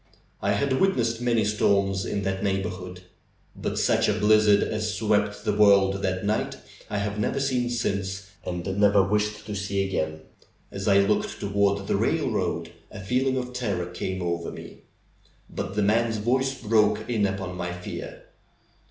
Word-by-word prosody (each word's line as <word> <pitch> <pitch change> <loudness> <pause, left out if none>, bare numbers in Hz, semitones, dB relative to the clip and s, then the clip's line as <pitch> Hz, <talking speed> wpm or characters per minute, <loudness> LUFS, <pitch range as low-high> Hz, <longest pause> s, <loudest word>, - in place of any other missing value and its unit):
I 100 +1 +1
had 130 +6 0
witnessed 120 -12 +1
many 120 -3 +2
storms 100 -2 +1
in 100 - -2
that 95 +1 -2
neigh 95 -1 0
borhood, 90 0 -6 0.5
but - - -3
such - - +2
a - - +3
blizzard 105 0 +4
as 110 -1 -2
swept 105 -1 0
the 105 - +1
world 100 -2 +4
that 95 0 -1
night 105 +1 -1 0.3
I 105 - -2
have 100 +1 -2
never 120 +6 0
seen 130 -3 0
since, 100 -4 -2
and 90 -1 -4
never 100 -1 +5
wish 105 +2 -1
to 105 - -6
see 100 0 -1
again. 80 -5 -2 0.5
As 95 0 -5
I 100 -1 +5
looked 100 +2 0
toward 100 -1 +1
the - - 0
railroad - - -1 0.2
a - - -9
feeling 130 +6 0
of 125 -1 -4
terror 100 -8 -2
came 90 +1 -4
over 85 -1 -2
me. - - -10 0.7
But 95 - -5
the 105 - +2
man's 110 +2 +2
voice 130 +5 0
broke 105 -2 +2
in 110 -4 +1
upon 95 -2 -4
my 90 -1 -3
fear. 90 0 -7
100 Hz, 165 wpm, -25 LUFS, 95-110 Hz, 0.7 s, never